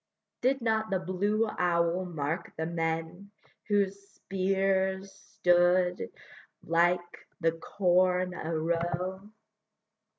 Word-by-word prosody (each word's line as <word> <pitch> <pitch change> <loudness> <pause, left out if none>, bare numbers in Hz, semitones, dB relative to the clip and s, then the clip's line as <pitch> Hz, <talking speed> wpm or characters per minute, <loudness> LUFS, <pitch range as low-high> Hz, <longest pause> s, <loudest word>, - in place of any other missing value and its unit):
Did 265 +1 +2
not 220 -1 0
the 195 - +1
blue 200 +5 0
owl 175 -1 +1
mark 160 -2 -3
the 160 - -1
men 165 +3 -3 0.4
Whose 200 -1 +1
spears 190 0 0
stood 180 - +2 0.5
like 175 +1 +1
the 165 -2 +2
corn 180 +1 +1
a 165 -2 -3
row? 175 +4 -2
180 Hz, 95 wpm, -29 LUFS, 170-195 Hz, 0.5 s, Did